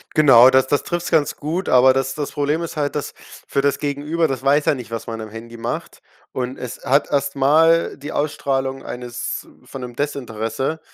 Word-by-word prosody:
Genau, 130 Hz, -5 st, +8 dB
das 130 Hz, 0 st, +3 dB
das 145 Hz, -, +1 dB
trifft's 175 Hz, 0 st, -3 dB
ganz 150 Hz, -3 st, +2 dB
gut, 165 Hz, +6 st, -3 dB
aber 130 Hz, +1 st, +6 dB
das 135 Hz, 0 st, -1 dB
das 145 Hz, -2 st, -4 dB
Problem 145 Hz, +3 st, 0 dB
ist 165 Hz, -2 st, -6 dB
halt, 145 Hz, -1 st, -1 dB
dass 145 Hz, -, -3 dB, 0.3 s
für 140 Hz, -, 0 dB
das 140 Hz, 0 st, +1 dB
Gegenüber 150 Hz, +3 st, -1 dB
das 135 Hz, -2 st, -3 dB
weiß 145 Hz, +2 st, +3 dB
ja -, -, +4 dB
nicht, 125 Hz, -4 st, -7 dB
was 115 Hz, -1 st, -5 dB
man 115 Hz, -1 st, -5 dB
am 110 Hz, -, -7 dB
Handy 115 Hz, +2 st, -10 dB
macht 115 Hz, +1 st, -5 dB, 0.3 s
und 130 Hz, 0 st, -4 dB
es 125 Hz, -, -7 dB
hat 140 Hz, +3 st, +2 dB
erst 140 Hz, 0 st, 0 dB
mal 160 Hz, +5 st, +3 dB
die 145 Hz, +2 st, -7 dB
Ausstrahlung 135 Hz, -2 st, -1 dB
eines 125 Hz, -1 st, -5 dB, 0.2 s
von 135 Hz, -, -8 dB
'nem 120 Hz, -1 st, -7 dB
Desinteresse 130 Hz, 0 st, -3 dB
140 Hz, 195 wpm, -20 LUFS, 125-150 Hz, 0.3 s, Genau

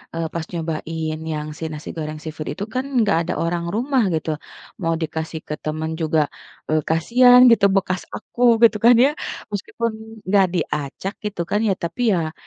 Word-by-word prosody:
eee, 165 Hz, -1 st, -1 dB
pas 165 Hz, -1 st, -3 dB
nyobain 160 Hz, -1 st, -3 dB
yang 150 Hz, 0 st, -4 dB
si -, -, -7 dB
nasi 155 Hz, -1 st, -7 dB
goreng 155 Hz, -1 st, -5 dB
seafood 155 Hz, -1 st, -6 dB
itu -, -, -3 dB
kan, 255 Hz, +1 st, -1 dB
enggak 220 Hz, -9 st, +2 dB
ada -, -, 0 dB
orang 170 Hz, 0 st, -2 dB
rumah 255 Hz, +2 st, +1 dB
gitu. 160 Hz, 0 st, -3 dB, 0.5 s
Mau 165 Hz, -1 st, +1 dB
dikasih 160 Hz, 0 st, -4 dB
ke 150 Hz, -, -3 dB
teman 155 Hz, +1 st, -3 dB
juga, 155 Hz, -1 st, +2 dB, 0.5 s
eee, 155 Hz, 0 st, +3 dB
kasihan 245 Hz, +10 st, +6 dB
gitu 210 Hz, -3 st, +5 dB
bekas 185 Hz, -1 st, 0 dB
aku 245 Hz, -, -8 dB, 0.2 s
gitu 225 Hz, -2 st, +6 dB
kan 240 Hz, +1 st, +7 dB
ya. 265 Hz, +4 st, +5 dB, 0.4 s
Meskipun 230 Hz, +3 st, -2 dB, 0.3 s
enggak 195 Hz, 0 st, +4 dB
diacak 150 Hz, +8 st, -3 dB
gitu 205 Hz, -4 st, -3 dB
kan 205 Hz, +4 st, 0 dB
ya, 195 Hz, -, +3 dB
tapi 170 Hz, +9 st, -5 dB
ya 160 Hz, -2 st, -2 dB
170 Hz, 175 wpm, -21 LUFS, 155-210 Hz, 0.5 s, kan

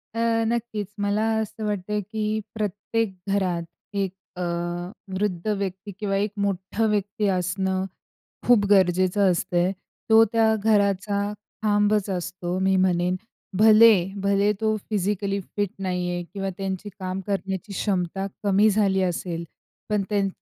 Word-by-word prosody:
अ, -, -, -2 dB, 0.3 s
नक्कीच 225 Hz, -3 st, -2 dB
मला 205 Hz, +1 st, +1 dB, 0.2 s
असं 220 Hz, 0 st, -5 dB
वाटतं 210 Hz, 0 st, -1 dB
की 220 Hz, -1 st, -2 dB, 0.3 s
प्रत्येक 210 Hz, +1 st, -1 dB, 0.2 s
घरात 180 Hz, -4 st, 0 dB, 0.3 s
एक 195 Hz, -2 st, 0 dB, 0.2 s
अ, 180 Hz, -, -5 dB, 0.7 s
वृद्ध 190 Hz, -2 st, -1 dB
व्यक्ती 200 Hz, -1 st, -2 dB
किंवा 200 Hz, -2 st, -1 dB
एक 205 Hz, +1 st, 0 dB
मोठा 200 Hz, +2 st, -1 dB
व्यक्ती 210 Hz, +1 st, 0 dB
असणं 190 Hz, 0 st, 0 dB, 0.6 s
खूप 240 Hz, -4 st, +5 dB
गरजेचं 185 Hz, 0 st, +4 dB
असतंय, 175 Hz, +1 st, +1 dB, 0.4 s
तो 225 Hz, 0 st, +8 dB
त्या 225 Hz, -1 st, +4 dB
घराचा 200 Hz, -1 st, +2 dB, 0.4 s
खांबच 205 Hz, -1 st, +2 dB
असतो, 180 Hz, 0 st, -3 dB
मी 190 Hz, 0 st, +2 dB
म्हणेन 180 Hz, -1 st, +2 dB, 0.4 s
भले 220 Hz, +1 st, +8 dB, 0.3 s
भले 200 Hz, +1 st, +3 dB
तो 215 Hz, 0 st, +2 dB
फिजिकली 200 Hz, -1 st, 0 dB
फिट 205 Hz, +1 st, -3 dB
नाही 180 Hz, -2 st, -1 dB
आहे 175 Hz, 0 st, -2 dB
किंवा 195 Hz, -1 st, -2 dB
त्यांची 195 Hz, +1 st, -3 dB
काम 185 Hz, 0 st, -3 dB
करण्याची 195 Hz, 0 st, -3 dB
क्षमता 195 Hz, -1 st, -1 dB, 0.2 s
कमी 205 Hz, +1 st, +4 dB
झाली 195 Hz, -2 st, +2 dB
असेल. 175 Hz, -1 st, -2 dB, 0.4 s
पण 210 Hz, -1 st, +1 dB
त्यां 200 Hz, -2 st, +2 dB
200 Hz, 130 wpm, -24 LUFS, 185-210 Hz, 0.7 s, तो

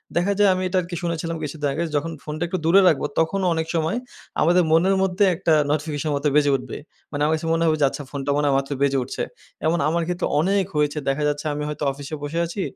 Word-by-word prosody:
দেখা 180 Hz, +4 st, +2 dB
যায় 205 Hz, -1 st, +6 dB
আমি 185 Hz, 0 st, -2 dB
এটা 185 Hz, +1 st, -1 dB
আরকি 175 Hz, 0 st, -6 dB
শুনেছিলাম 165 Hz, 0 st, -2 dB
কিছুদিন 150 Hz, 0 st, -3 dB
আগে 165 Hz, -, -1 dB
যখন 160 Hz, +3 st, -1 dB
ফোনটা 155 Hz, +2 st, -4 dB
একটু 185 Hz, +2 st, -2 dB
দূরে 190 Hz, +4 st, +6 dB
রাখবো 145 Hz, -3 st, +3 dB
তখনও 185 Hz, +4 st, +1 dB
অনেক 160 Hz, 0 st, -2 dB
সময় 165 Hz, +6 st, 0 dB, 0.4 s
আমাদের 175 Hz, +3 st, +4 dB
মনের 185 Hz, +4 st, +4 dB
মধ্যে 190 Hz, +2 st, +1 dB
একটা 165 Hz, -2 st, +1 dB, 0.2 s
নোটিফিশনে 150 Hz, 0 st, -2 dB
মতো 140 Hz, +1 st, 0 dB
বেজে 145 Hz, -1 st, +4 dB
উঠবে। 130 Hz, -, -5 dB, 0.3 s
আমার 145 Hz, +1 st, 0 dB
কাছে 160 Hz, +1 st, -2 dB
মনে 165 Hz, -, +1 dB
হবে 155 Hz, -, +3 dB
যে -, -, +6 dB
আচ্ছা 145 Hz, -, -7 dB
ফোনটা 140 Hz, -1 st, -4 dB
মনে 145 Hz, -, +1 dB
হয় 140 Hz, -, +3 dB
মাত্র 135 Hz, +1 st, -3 dB
বেজে 140 Hz, -1 st, +2 dB
উঠছে। 125 Hz, -, -4 dB, 0.4 s
এমন 170 Hz, +2 st, +2 dB
আমার 170 Hz, +1 st, 0 dB
ক্ষেত্রে 180 Hz, 0 st, -1 dB
অনেক 195 Hz, +3 st, +2 dB
হয়েছে 150 Hz, 0 st, +1 dB
দেখা 145 Hz, +2 st, 0 dB
যাচ্ছে 145 Hz, +1 st, -2 dB
আমি 150 Hz, -, -3 dB
হয়তো 150 Hz, 0 st, -5 dB
অফিসে 145 Hz, +2 st, -7 dB
বসে 160 Hz, +4 st, -2 dB
আছি 180 Hz, +4 st, -5 dB
160 Hz, 225 wpm, -23 LUFS, 145-175 Hz, 0.4 s, যায়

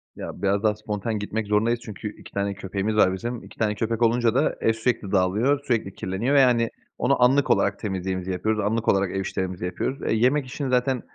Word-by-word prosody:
Ya, -, -, -7 dB
biraz 100 Hz, +1 st, +1 dB
daha 105 Hz, -1 st, +3 dB
spontan 105 Hz, +1 st, -3 dB
gitmek 105 Hz, +1 st, -3 dB
zorundayız 110 Hz, +3 st, +2 dB
çünkü 105 Hz, 0 st, -6 dB
2 -, -, -14 dB
tane 100 Hz, 0 st, -1 dB
köpeğimiz 100 Hz, +2 st, -3 dB
var 95 Hz, -3 st, +4 dB
bizim. 120 Hz, +5 st, -4 dB
2 -, -, -14 dB
tane 105 Hz, -1 st, 0 dB
köpek 115 Hz, +2 st, -2 dB
olunca 115 Hz, 0 st, +3 dB
da 140 Hz, +4 st, +2 dB
ev 115 Hz, -, +3 dB
sürekli 110 Hz, -3 st, -1 dB
dağılıyor, 105 Hz, +9 st, +2 dB
sürekli 115 Hz, -8 st, -1 dB
kirleniyor 100 Hz, +10 st, -1 dB
ve, -, -, +7 dB
yani, 120 Hz, -3 st, +4 dB, 0.3 s
onu 125 Hz, 0 st, +2 dB
anlık 135 Hz, +3 st, +4 dB
olarak -, -, +2 dB
temizliğimizi 95 Hz, -2 st, -3 dB
yapıyoruz, 110 Hz, +4 st, -1 dB
anlık 110 Hz, +2 st, -1 dB
olarak 95 Hz, -1 st, +2 dB
ev 95 Hz, -, -2 dB
işlerimizi 95 Hz, -2 st, -3 dB
yapıyoruz. 130 Hz, +9 st, -3 dB
E, -, -, +1 dB
yemek 130 Hz, +6 st, +2 dB
işini 135 Hz, +2 st, -4 dB
zaten, 125 Hz, 0 st, +1 dB
110 Hz, 205 wpm, -24 LUFS, 100-120 Hz, 0.3 s, ve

